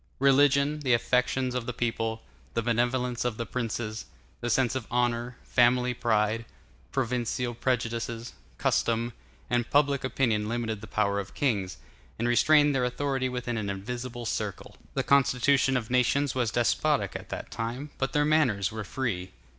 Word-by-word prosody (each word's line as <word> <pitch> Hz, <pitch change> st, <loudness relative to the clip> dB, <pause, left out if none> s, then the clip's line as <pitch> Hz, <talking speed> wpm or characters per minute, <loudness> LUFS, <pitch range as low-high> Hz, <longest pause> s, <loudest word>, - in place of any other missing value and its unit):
Religion, 140 Hz, +2 st, +4 dB
the 130 Hz, -5 st, +3 dB
affections 125 Hz, +1 st, +1 dB
of 125 Hz, -2 st, -3 dB
the 125 Hz, -, -2 dB
people, 115 Hz, -1 st, -2 dB, 0.3 s
the 115 Hz, -, +1 dB
benevolence 120 Hz, +1 st, 0 dB
of 120 Hz, -3 st, -2 dB
the 115 Hz, -, -3 dB
prince, 120 Hz, -3 st, -3 dB, 0.6 s
the 120 Hz, -, -3 dB
sense 125 Hz, +1 st, +2 dB
of 130 Hz, -4 st, -4 dB
honor, 120 Hz, 0 st, 0 dB
family 125 Hz, 0 st, +3 dB
pride, 110 Hz, -1 st, +1 dB, 0.5 s
provincial 125 Hz, -1 st, -1 dB
prejudices, 115 Hz, -1 st, -2 dB, 0.2 s
custom, 115 Hz, +1 st, +1 dB, 0.3 s
and 120 Hz, -2 st, 0 dB
public 140 Hz, -1 st, +3 dB
opinion 115 Hz, -5 st, 0 dB
limited 115 Hz, -3 st, -2 dB
the -, -, -9 dB
power 100 Hz, -1 st, +1 dB
of 100 Hz, -1 st, -7 dB
kings, 100 Hz, -10 st, 0 dB, 0.4 s
and 115 Hz, -, 0 dB
restrained 145 Hz, +4 st, +5 dB
their 130 Hz, -2 st, +1 dB
authority 130 Hz, +1 st, -1 dB
within 125 Hz, -2 st, -3 dB
an 105 Hz, -2 st, -2 dB
invisible 120 Hz, +5 st, -5 dB
circle. 105 Hz, -4 st, -4 dB, 0.2 s
The -, -, +1 dB
constitution 135 Hz, -1 st, +3 dB
of 115 Hz, -1 st, -5 dB
nations 130 Hz, +2 st, +2 dB
was 125 Hz, -3 st, 0 dB
despotic 120 Hz, 0 st, +1 dB
at -, -, -7 dB
that -, -, -6 dB
time, 125 Hz, +6 st, -4 dB
but 135 Hz, -, 0 dB
their 150 Hz, -1 st, +2 dB
manners 125 Hz, -11 st, +2 dB
were 110 Hz, -1 st, -5 dB
free. 100 Hz, -6 st, -3 dB
120 Hz, 155 wpm, -28 LUFS, 115-130 Hz, 0.6 s, restrained